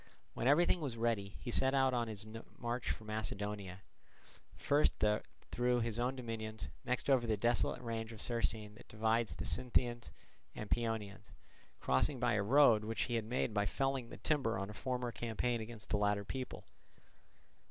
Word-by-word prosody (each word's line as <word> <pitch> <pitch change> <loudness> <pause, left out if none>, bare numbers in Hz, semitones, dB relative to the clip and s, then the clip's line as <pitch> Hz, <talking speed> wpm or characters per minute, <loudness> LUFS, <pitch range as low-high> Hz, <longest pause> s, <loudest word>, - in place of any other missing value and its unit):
When 120 - -1
everything 175 +5 +5
was 130 -6 -3
ready, 110 -4 0
he 120 - -4
set 130 +3 +3
out 135 -1 +4
on 120 -1 +1
his 105 -1 -5 0.3
march 120 +1 -2
for - - -2
Macedonia, 105 -2 -4 0.7
first 145 +2 +3 0.6
through 125 0 +2
his 115 0 -1
own 125 +2 0
dominions, 110 -3 -5
next 125 0 -1
over 130 -4 +4
the 110 -2 +1
desolate 120 +3 +2
range 115 -1 -3
of 110 - -10
Cercine 110 -3 -1
that - - -15
divides 110 +1 +1
the - - -4
Sintians 120 -1 0 0.5
and 105 - -6
Paeonians, 110 -4 -2 0.5
crossing 125 - +2
by 120 -1 +2
a 105 - +2
road 115 -1 +6
which 110 0 -1
he 120 - -3
had 115 -2 0
made 120 0 -1
by 105 -1 +1
felling 135 -2 -1
the - - -9
timber 135 -9 +1
on 95 +2 -3
a - - -9
former 125 +1 -2
campaign 115 +1 -1
against 110 -2 -7
the 105 - +3
latter 105 0 +1
people. 130 +5 -5
115 Hz, 170 wpm, -36 LUFS, 105-125 Hz, 0.7 s, road